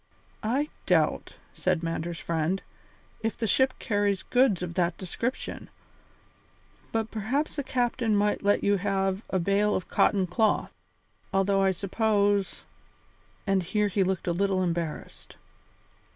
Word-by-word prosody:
"I 270 Hz, +7 st, 0 dB, 0.2 s
doubt," -, -, +2 dB, 0.2 s
said 180 Hz, -2 st, 0 dB
Mander's 165 Hz, 0 st, -3 dB
friend, 165 Hz, +3 st, -1 dB, 0.6 s
"if 225 Hz, -1 st, -2 dB
the 230 Hz, -, -1 dB
ship 260 Hz, +5 st, +3 dB
carries 205 Hz, -3 st, 0 dB
goods 245 Hz, -8 st, +2 dB
of 170 Hz, -1 st, -4 dB
that 175 Hz, -1 st, 0 dB
description, 230 Hz, +7 st, -4 dB, 1.2 s
but 225 Hz, -1 st, -1 dB
perhaps 250 Hz, +8 st, -1 dB
the 285 Hz, -, -2 dB
captain 240 Hz, -3 st, 0 dB
might 205 Hz, 0 st, +1 dB
let 205 Hz, 0 st, +2 dB
you 200 Hz, 0 st, +3 dB
have 195 Hz, 0 st, 0 dB
a 190 Hz, -, +1 dB
bale 200 Hz, +3 st, +2 dB
of 185 Hz, -, -3 dB
cotton 195 Hz, -3 st, +3 dB
cloth, 205 Hz, +5 st, +1 dB, 0.6 s
although 195 Hz, 0 st, +2 dB
I 195 Hz, -, +4 dB
suppose 200 Hz, +1 st, +1 dB, 0.4 s
" -, -, -35 dB
and 195 Hz, -2 st, +2 dB
here 210 Hz, +4 st, 0 dB
he 195 Hz, 0 st, +2 dB
looked 190 Hz, -1 st, -1 dB
a 175 Hz, -, +1 dB
little 190 Hz, +1 st, +1 dB
embarrassed. 170 Hz, -3 st, -4 dB
200 Hz, 135 wpm, -27 LUFS, 185-220 Hz, 1.2 s, I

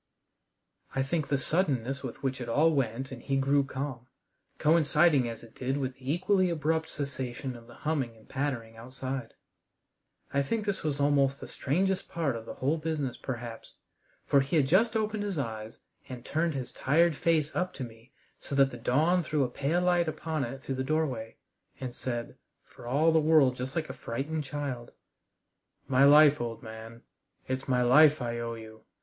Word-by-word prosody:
I 135 Hz, -, +2 dB
think 150 Hz, +2 st, -1 dB
the 140 Hz, -, +1 dB
suddenness 135 Hz, -4 st, 0 dB
with -, -, -7 dB
which 135 Hz, -1 st, -1 dB
it 120 Hz, -, -5 dB
all 155 Hz, +7 st, +4 dB
went 130 Hz, -2 st, -1 dB
and 130 Hz, -, -8 dB
he 135 Hz, -, -1 dB
grew 140 Hz, +1 st, +3 dB
calm, 130 Hz, -2 st, -5 dB, 0.5 s
coinciding 155 Hz, -4 st, +4 dB
as 115 Hz, -, -8 dB
it 115 Hz, -, -14 dB
did 130 Hz, +2 st, -2 dB
with 130 Hz, -2 st, -2 dB
the 130 Hz, +2 st, -4 dB
equally 185 Hz, +2 st, +2 dB
abrupt 160 Hz, 0 st, 0 dB
cessation 130 Hz, -3 st, -4 dB
of 115 Hz, -1 st, -13 dB
the -, -, -14 dB
humming 135 Hz, -7 st, -2 dB
and 110 Hz, -, -20 dB
pattering 130 Hz, -5 st, -3 dB
outside 130 Hz, +1 st, -6 dB, 1.0 s
I 140 Hz, -, +3 dB
think 210 Hz, +10 st, -1 dB
this 200 Hz, -2 st, -1 dB
was 145 Hz, -2 st, -2 dB
almost 140 Hz, -1 st, +3 dB
the -, -, -8 dB
strangest 185 Hz, +7 st, -1 dB
part 160 Hz, -7 st, -1 dB
of 115 Hz, -1 st, -7 dB
the -, -, -6 dB
whole 145 Hz, +5 st, 0 dB
business 155 Hz, -5 st, -2 dB
perhaps. 120 Hz, -3 st, -7 dB, 0.5 s
For 140 Hz, -, +4 dB
he 140 Hz, +3 st, +2 dB
just 205 Hz, -, +3 dB
opened 215 Hz, -1 st, -1 dB
his 200 Hz, -4 st, -2 dB
eyes 110 Hz, -4 st, -4 dB, 0.3 s
and 125 Hz, -2 st, -8 dB
turned 160 Hz, 0 st, 0 dB
his 130 Hz, -3 st, -4 dB
tired 165 Hz, +4 st, +2 dB
face 155 Hz, -1 st, +1 dB
up 185 Hz, 0 st, 0 dB
to 135 Hz, -, -5 dB
me 115 Hz, 0 st, -12 dB, 0.3 s
so 140 Hz, -, -5 dB
that 135 Hz, -1 st, +4 dB
the 120 Hz, -, -7 dB
dawn 155 Hz, +10 st, +2 dB
threw 150 Hz, -3 st, 0 dB
a 125 Hz, -, -1 dB
pale 150 Hz, +8 st, 0 dB
light 175 Hz, -1 st, +3 dB
upon 155 Hz, -1 st, -2 dB
it 130 Hz, +2 st, -6 dB
through 135 Hz, -, -3 dB
the -, -, 0 dB
doorway, 130 Hz, -7 st, -1 dB, 0.4 s
and 130 Hz, -2 st, -5 dB
said, 120 Hz, -2 st, -4 dB, 0.3 s
for 120 Hz, -, -13 dB
all 150 Hz, +6 st, +3 dB
the 160 Hz, -, +4 dB
world 155 Hz, -5 st, +4 dB
just 130 Hz, +2 st, -5 dB
like 160 Hz, -2 st, -1 dB
a 130 Hz, -, -6 dB
frightened 140 Hz, +5 st, -4 dB
child: 135 Hz, -4 st, -5 dB, 0.9 s
"My 135 Hz, 0 st, +5 dB
life, 150 Hz, 0 st, +7 dB
old 115 Hz, 0 st, -4 dB
man 110 Hz, +1 st, -10 dB, 0.4 s
it's 130 Hz, 0 st, -3 dB
my 125 Hz, -2 st, +2 dB
life 150 Hz, +5 st, +6 dB
I 120 Hz, -1 st, -3 dB
owe 115 Hz, 0 st, -3 dB
you. 110 Hz, -1 st, -12 dB
135 Hz, 185 wpm, -29 LUFS, 125-155 Hz, 1.0 s, life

